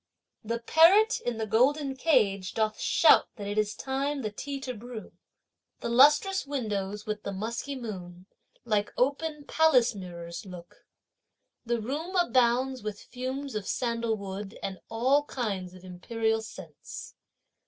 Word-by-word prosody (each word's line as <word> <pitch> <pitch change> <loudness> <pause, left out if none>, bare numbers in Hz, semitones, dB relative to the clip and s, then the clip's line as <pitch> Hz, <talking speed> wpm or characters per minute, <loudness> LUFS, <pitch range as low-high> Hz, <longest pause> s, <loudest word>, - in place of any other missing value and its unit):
The 230 +2 -2
parrot 340 - +5
in 240 -2 -2
the 220 - -2
golden 270 +6 +2
cage 215 - +2
doth 215 -1 0
shout 320 - +5
that 205 - -7
it 205 +1 -1
is 210 0 0
time 275 +1 -2
the 215 - -2
tea 275 +6 -5
to 255 -2 -4
brew. 235 0 -9 0.7
The - - -3
lustrous 295 +9 +5
windows 210 -6 -3
with 215 -1 -3
the 200 - -4
musky 230 +8 -4
moon 185 -7 -7 0.4
like 210 -3 0
open 290 +3 0
palace 285 -6 +4
mirrors 170 -3 -7
look; 180 -3 -12 0.8
The 235 0 +1
room 300 - -4
abounds 255 -4 +2
with 210 -1 -5
fumes 260 +2 -5
of 210 -2 -4
sandalwood 220 -5 -2
and 190 -1 -4
all 260 +6 +3
kinds 195 -9 -4
of 185 - -14
imperial 220 +5 -1
scents. 180 -8 -10
230 Hz, 140 wpm, -28 LUFS, 205-270 Hz, 0.8 s, parrot